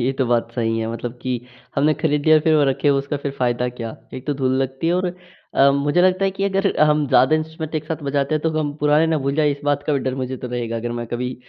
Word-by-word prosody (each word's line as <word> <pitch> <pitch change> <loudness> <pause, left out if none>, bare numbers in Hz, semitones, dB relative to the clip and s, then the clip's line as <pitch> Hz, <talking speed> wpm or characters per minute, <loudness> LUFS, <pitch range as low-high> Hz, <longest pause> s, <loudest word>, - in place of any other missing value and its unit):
ये 130 +3 +1
तो 130 - +2
बात 115 -1 +1
सही 115 -2 0
है 110 - -2
मतलब 120 +1 -6
कि 130 - -3 0.4
हमने 150 +2 +3
ख़रीद 150 -2 +1
लिया 155 0 +7
फिर 160 0 +2
वो 145 - +4
रखे 145 +2 +1
उसका 140 +1 0
फिर 140 -1 -4
फ़ायदा 125 0 0
क्या? 115 -2 -7 0.2
एक 130 +2 -8
तो 145 - 0
धूल 130 -1 0
लगती 135 +4 -3
है 170 - +3
और 185 0 0 0.5
अ, 140 +1 +6
मुझे 145 +5 +2
लगता 185 +1 +3
है 195 - +2
कि 195 +1 -3
अगर 195 0 +1
हम 150 -1 +4
ज़्यादा 135 +3 +5
इंस्ट्रूमेंट 160 0 -5
एक 155 -1 -2
साथ 160 -1 -5
बजाते 140 +1 0
हैं, 155 - -1
तो 160 - +1
हम 145 -2 -2
पुराने 150 +2 +4
ना 160 -1 +1
भूल 140 0 -1
जाएँ 150 -1 +3
इस 140 - -9
बात 145 0 +1
का 150 - +1
भी 140 - +2
डर 130 - -2
मुझे 130 0 -4
तो 125 - -7
रहेगा 120 -1 -3
अगर 120 +1 -3
मैं 120 - -5
कभी 125 +2 -3
140 Hz, 275 wpm, -21 LUFS, 125-155 Hz, 0.5 s, लिया